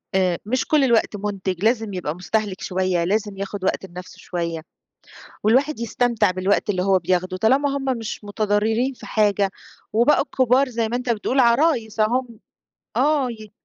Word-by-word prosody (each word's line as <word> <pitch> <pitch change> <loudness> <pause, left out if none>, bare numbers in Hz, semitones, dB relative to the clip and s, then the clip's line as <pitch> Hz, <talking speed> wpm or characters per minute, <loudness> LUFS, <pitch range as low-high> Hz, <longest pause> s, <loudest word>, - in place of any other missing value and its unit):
آآ 180 -3 +2
مش 255 +4 0
كُلّ 300 -3 +3
الوقت 230 -4 +2
منتج، 195 -2 -3
لازم 225 -3 +1
يبقى 170 -4 -3
مستهلك 200 +1 -2
شوية، 185 -2 0
لازم 205 +1 -1
ياخد 195 0 -5
وقت 190 - -1
لنَفْسه 180 0 -10
شوية، 170 -2 -4 0.8
والواحد 260 +5 +2
يستمتع 235 -3 +1
بالوقت 190 +3 0
اللي 185 -2 0
هو 190 -1 +3
بياخده، 185 +1 -1
طالما 275 +6 +2
هُم 270 - -5
مش 225 -1 -6
متضررين 215 +5 0
في - - -13
حاجة، 205 -2 +2 0.4
وبقوا 240 +6 +4
كبار 260 +1 +3
زَي 230 -2 -1
ما 240 - -3
أنت 250 -1 -5
بتقول، 235 +4 0
عرايس 235 -3 +2
اهُم 235 +1 0 0.6
آه 290 -4 +2
ي 215 -2 -10
215 Hz, 160 wpm, -22 LUFS, 190-245 Hz, 0.8 s, وبقوا